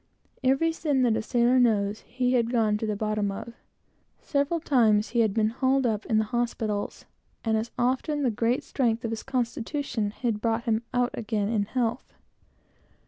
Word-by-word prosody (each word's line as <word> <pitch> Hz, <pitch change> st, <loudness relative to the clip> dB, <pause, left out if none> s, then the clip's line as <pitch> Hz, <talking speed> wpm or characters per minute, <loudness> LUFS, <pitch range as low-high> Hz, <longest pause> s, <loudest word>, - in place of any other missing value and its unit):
Every 270 Hz, +6 st, +3 dB
sin 295 Hz, -5 st, 0 dB
that 235 Hz, -3 st, +3 dB
a 225 Hz, -, 0 dB
sailor 240 Hz, +3 st, +3 dB
knows, 210 Hz, -3 st, +2 dB
he 250 Hz, 0 st, -1 dB
had 235 Hz, -2 st, +2 dB
gone 225 Hz, -3 st, +2 dB
to 220 Hz, -, -2 dB
the 210 Hz, -, -1 dB
bottom 215 Hz, -1 st, -1 dB
of. 225 Hz, +4 st, -7 dB, 0.7 s
Several 285 Hz, +3 st, 0 dB
times 220 Hz, -8 st, +3 dB
he 240 Hz, -, 0 dB
had 220 Hz, -3 st, +3 dB
been 215 Hz, +1 st, +2 dB
hauled 265 Hz, +2 st, +1 dB
up 215 Hz, -2 st, -1 dB
in 220 Hz, -, +2 dB
the 220 Hz, -, +3 dB
hospitals, 220 Hz, -2 st, -2 dB, 0.4 s
and 220 Hz, -1 st, +2 dB
as 220 Hz, +2 st, -1 dB
often, 265 Hz, +4 st, 0 dB
the 250 Hz, -, +2 dB
great 230 Hz, +4 st, 0 dB
strength 235 Hz, -3 st, 0 dB
of 225 Hz, -, -2 dB
his 225 Hz, -, -3 dB
constitution 250 Hz, -2 st, -2 dB
had 220 Hz, 0 st, -2 dB
brought 230 Hz, 0 st, 0 dB
him 225 Hz, -1 st, +1 dB
out 245 Hz, 0 st, +1 dB
again 215 Hz, -2 st, -2 dB
in 215 Hz, -3 st, +1 dB
health. 240 Hz, +2 st, -2 dB
230 Hz, 180 wpm, -27 LUFS, 215-255 Hz, 0.7 s, Every